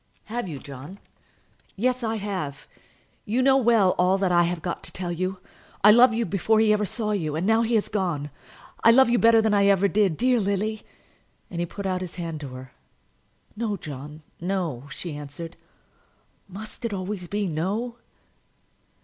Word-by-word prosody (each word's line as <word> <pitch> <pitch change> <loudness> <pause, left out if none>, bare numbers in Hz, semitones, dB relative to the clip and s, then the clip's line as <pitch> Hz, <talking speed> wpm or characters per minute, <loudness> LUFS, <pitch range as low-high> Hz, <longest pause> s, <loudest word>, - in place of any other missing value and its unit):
"Have 235 -1 -4
you, 155 -5 -5
John?" 140 +7 -10 0.8
"Yes, 255 +4 0
I 225 0 -1
have. 190 -9 -4 0.6
You 240 +5 0
know 265 0 +5
well 230 -7 +4
all 185 +2 +4
that 190 -2 +1
I 175 -1 +4
have 175 -1 -3
got 175 - -3
to - - -6
tell 180 -2 -4
you. 185 +2 -2 0.5
I 210 - +9
loved 240 +1 +6
you 230 0 0
before 200 +4 +1
he 215 -1 +4
ever 210 -1 0
saw 215 +2 -2
you; 160 -8 -1
and 165 +4 -1
now 225 +2 +4
that 230 - 0
he 235 - +1
has 215 - +1
gone, 170 -8 -2 0.5
I - - +7
love 245 +1 +6
you 240 - +3
better 225 -1 +5
than 220 -1 +2
I 200 -1 +4
ever 200 0 +4
did. 195 -5 +1
Dear 250 -1 +3
Lily!" 210 +2 -1 0.7
and 170 - -4
he 175 - -1
put 200 +3 -7
out 185 -1 -1
his 180 -2 -6
hand 165 -3 -5
to 145 - -6
her. 130 0 -10 0.8
"No, 215 -2 -2
John; 150 0 -9 0.2
no," 170 -8 -3
she 165 +1 -6
answered. 150 +4 -8 0.9
"Must 210 +5 -9
it 230 - 0
be 205 - -4
always 185 -1 -5
no?" 205 +5 -2
195 Hz, 185 wpm, -25 LUFS, 170-220 Hz, 0.9 s, I